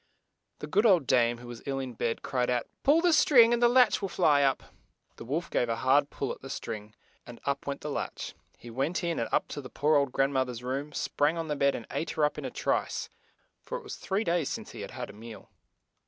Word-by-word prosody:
The - - -6
good 200 +9 +3
old 180 -8 +4
dame, 120 -2 +3
who 120 +1 -11
was 120 -1 -9
ill 135 -1 -1
in 130 -2 -4
bed, 115 0 -2
cried 125 -2 -1
out, 120 -2 0 0.2
"Pull 300 +4 +4
the 350 -1 +4
string 240 -6 +6
and 240 - +1
the 240 - +6
latch 250 -3 +4
will 195 - -2
fly 155 -5 +3
up." 135 -1 +2 0.5
The - - -8
wolf 150 +8 -3
gave 120 - +1
a 115 - +1
hard 140 +4 +3
pull 135 - -3
at - - -8
the 135 - -9
string, 105 -4 -6 0.3
and 120 -1 -10
up 140 0 -2
went 140 0 -3
the 150 - -4
latch. - - -4 0.2
He 120 - -11
went 140 +10 -1
in, 170 -1 -1
and 115 - -2
up - - +1
to 145 - -5
the 130 - -10
poor 150 +1 +2
old 140 -2 +1
grand 135 +1 +1
moth 130 -1 +1
er's 120 0 -7
room, 135 +4 -3
sprang 150 +2 0
on 165 -1 -4
the 150 - 0
bed 140 -1 +2
and 115 - -6
ate 165 - -2
her 150 - +4
up 150 - -2
in - - -6
a - - -2
trice, - - -1 0.5
for - - -5
it - - -11
was 415 - -7
three 200 +3 -2
days 170 -6 0
since - - -6
he - - -8
had - - -6
had - - -6
a - - -18
meal. 110 -1 -11
140 Hz, 260 wpm, -29 LUFS, 125-170 Hz, 0.5 s, string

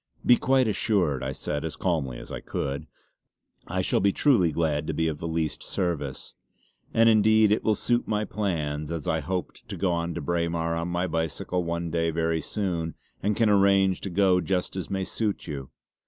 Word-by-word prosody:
"Be 125 - +7
quite 130 0 +2
assured," 95 - +1
I 65 0 -2
said 75 +2 -3
as 80 - -4
calmly 75 -9 -1
as - - -10
I - - -4
could 70 +1 -4 0.8
"I - - -1
shall - - +2
be 100 - +3
truly 105 - +3
glad 75 -2 0
to - - -2
be 80 - +1
of 75 -2 -3
the 85 - -4
least 80 -1 -2
service. 80 -7 -3 0.6
And 115 0 +4
indeed 110 -1 +5
it 105 - +2
will 110 - +3
just - - -6
suit 120 0 +1
my 105 0 0
plans, 75 -8 -2
as 80 -3 -4
I 80 - +1
hoped 90 +4 -4
to - - -5
go 85 -3 0
to 85 - -4
Braemar 85 +1 -1
on 85 +1 -2
my 90 +1 -1
bicycle 80 +2 -2
one 85 0 -3
day 85 0 +1
very 80 0 0
soon 85 -6 -2 0.3
and 105 +1 0
can 115 - +3
arrange 100 -2 +4
to 95 - -4
go 90 0 +3
just 90 -1 -1
as 95 - -4
may 95 -1 -1
suit 105 +1 -2
you. 70 -5 -6
85 Hz, 200 wpm, -26 LUFS, 80-100 Hz, 0.8 s, Be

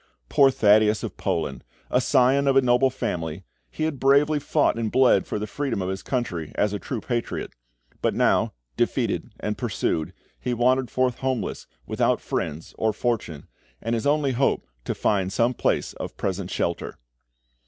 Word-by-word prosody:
Poor 140 -1 +6
Thaddeus 105 -3 +4
of - - -5
Poland! 80 -5 -2 0.3
A 125 - +3
scion 135 +2 +3
of 135 - +3
a 135 - +7
noble 125 +2 +4
family, 85 -8 -4 0.3
he 65 - -4
had 155 -4 -1
bravely 145 +3 +4
fought 145 +1 +2
and 115 -2 -2
bled 130 -7 +4
for - - -2
the 105 - -3
freedom 140 -2 -3
of 95 -1 -2
his 95 0 -3
country, 90 - -3
as 105 0 +1
a 105 - -2
true 120 0 -4
patriot; 120 -2 -3 0.5
but - - +1
now, - - +3 0.2
defeated - - -1
and - - -3
pursued, 80 +2 -1 0.3
he 125 -1 -2
wandered 125 +1 +2
forth 130 0 0
homeless, 130 -3 -2 0.2
without - - +1
friends 80 +3 -4
or 110 -1 +2
fortune, 100 - -2 0.3
and 115 - -2
his 115 +4 0
only 145 -1 +2
hope 130 +2 +1 0.2
to - - -2
find 95 -2 +1
some 115 +5 +2
place - - 0
of - - -7
present 95 -1 -2
shelter. 85 -3 -2
120 Hz, 170 wpm, -24 LUFS, 100-130 Hz, 0.5 s, a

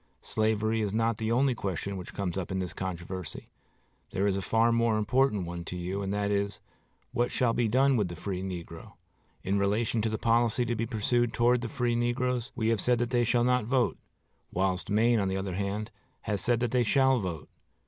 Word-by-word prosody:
Slavery 110 0 0
is 105 -1 -1
not 115 0 +1
the 110 0 -1
only 130 +2 +3
question 100 -2 -3
which 90 -2 -8
comes 90 -4 -2
up 95 -3 -3
in 95 - -1
this 90 -2 -3
controversy. 95 -1 -6 0.6
There 95 - -1
is 100 -2 +2
a 100 - -1
far 115 +5 +2
more 115 -1 +2
important 110 -2 +2
one 85 0 -5
to 90 - -5
you, 90 +3 -3
and 95 -1 -2
that 100 0 0
is, 100 0 -1 0.5
What 120 -1 +1
shall 120 -2 +1
be 120 -1 +1
done 130 +4 +3
with 105 -4 +1
the 85 - -7
free 95 +2 -4
negro?... 85 -3 -7 0.5
In 100 +2 +1
relation 110 +3 +1
to 110 - 0
the 110 - -2
policy 115 +1 +2
to 120 0 -1
be 115 +1 -2
pursued 120 +1 0
toward 120 +1 +3
the 120 - -4
free 120 0 0
negroes, 120 0 0
we 110 0 0
have 115 -4 +2
said 125 -1 +3
that 120 0 -1
they 120 -1 +3
shall 120 +1 +2
not 125 0 +2
vote; 125 +1 +1 0.5
whilst 95 0 -1
Maine, 115 +2 +3
on 100 - +1
the 95 0 -1
other 95 -1 -3
hand, 100 +3 -3 0.3
has 105 -2 -1
said 120 -1 +1
that 120 -2 0
they 125 - +3
shall 130 +2 +3
vote. 90 -7 -5
110 Hz, 215 wpm, -29 LUFS, 95-120 Hz, 0.6 s, only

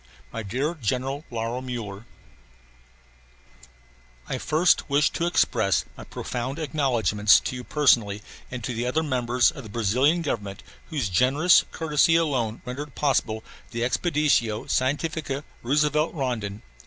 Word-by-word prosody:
MY - - -3
DEAR 130 - -2
GENERAL 130 +6 -2
LAURO 115 +1 -3
MULLER: 115 -5 -6 2.2
I - - -4
wish - - -3
first 160 +3 +3 0.3
to 170 - 0
express 100 - +2
my - - -10
profound 130 +3 -4
acknowledgments 120 - +3
to - - -4
you 125 - -6
personally 115 -9 +2 0.3
and 125 -2 -6
to 125 - -3
the 120 +2 -2
other 155 +6 +1
members 125 -3 +2
of - - -9
the 110 - -10
Brazilian 125 - +2
Government 105 -9 -4 0.3
whose 145 -9 -1
generous 135 - +4
courtesy 160 +1 +2
alone 130 -9 0
rendered 135 +2 -6
possible 115 -6 0 0.3
the 120 0 -4
Expedicao 125 -3 +1
Scientifica 145 +1 -1 0.2
Roosevelt 150 +5 +1
Rondon. 110 -8 -3
125 Hz, 130 wpm, -25 LUFS, 115-150 Hz, 2.2 s, generous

